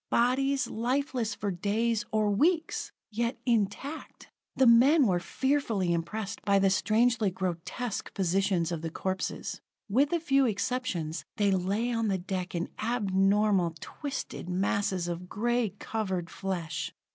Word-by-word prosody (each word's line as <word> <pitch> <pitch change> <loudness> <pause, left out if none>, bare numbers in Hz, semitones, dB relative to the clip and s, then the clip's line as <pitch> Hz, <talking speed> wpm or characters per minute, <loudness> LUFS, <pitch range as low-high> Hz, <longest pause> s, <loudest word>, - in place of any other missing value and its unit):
Bodies, 265 +2 +2
lifeless 240 -1 -1
for 205 - -2
days, 220 +5 0
or 215 -1 +2
weeks 320 - +1 0.2
yet 235 +3 -1
intact! 235 +6 -2 0.2
The 265 - +4
men 260 +6 +6
were 180 -5 +2
fearfully 225 -3 0
impressed 200 +5 -3
by 200 -1 +3
the 195 -1 +4
strangely 220 +2 +3
grotesque 185 +5 -4
positions 190 -2 +1
of 165 -2 -3
the 165 - -3
corpses. 190 +3 -3 0.3
With 265 +8 +2
a 345 - +2
few 275 -4 +3
exceptions, 205 -8 -2
they 205 -2 +3
lay 195 +6 0
on 230 -1 0
the 195 -2 +1
deck 185 0 -4
in 170 0 -2
abnormal, 200 -5 +2
twisted 280 - -6
masses 190 -1 0
of 175 +1 -5
gray 235 -2 0
covered 190 -7 -3
flesh. 185 -4 -3
205 Hz, 135 wpm, -29 LUFS, 185-245 Hz, 0.3 s, men